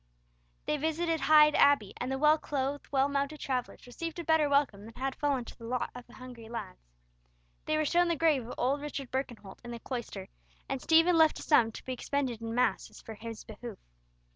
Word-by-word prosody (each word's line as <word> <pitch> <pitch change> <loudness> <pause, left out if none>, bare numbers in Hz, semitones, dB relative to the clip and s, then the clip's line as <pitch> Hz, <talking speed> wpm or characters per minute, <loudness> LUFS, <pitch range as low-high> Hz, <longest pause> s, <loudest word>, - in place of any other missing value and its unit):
They 300 - 0
visited 320 +2 0
Hyde 300 +1 +6
Abbey, 280 -11 +4
and 250 +2 -3
the 265 - -1
well 305 +2 +4
clothed, 280 0 -3
well 270 -1 +3
mounted 280 +2 -2
travellers 255 -2 -3
received 325 +7 -6
a 340 - -4
better 320 -2 +3
welcome 280 -8 +1
than 225 - -12
had 270 +1 -2
fallen 275 -4 -1
to - - -11
the 230 - -12
lot 250 0 -2
of 245 -1 -10
the - - -16
hungry 245 -3 -11
lads. 220 -6 -6 0.9
They 310 0 +1
were 310 - +1
shown 350 +3 +3
the 340 - +1
grave 295 -6 +2
of - - -7
old 275 +3 0
Richard 280 -3 -6
Birkenholt 240 -7 -5
in 240 - -9
the 235 - -5
cloister, 225 -7 -6 0.4
and 270 -1 -3
Stephen 330 +1 +4
left 315 -1 +5
a - - -7
sum 235 -7 +4
to - - -10
be 260 - -3
expended 255 -3 -2
in 225 0 -4
masses 225 -3 0
for 225 - -9
his 225 +1 -8
behoof. 220 -1 -9
270 Hz, 210 wpm, -30 LUFS, 235-300 Hz, 0.9 s, Hyde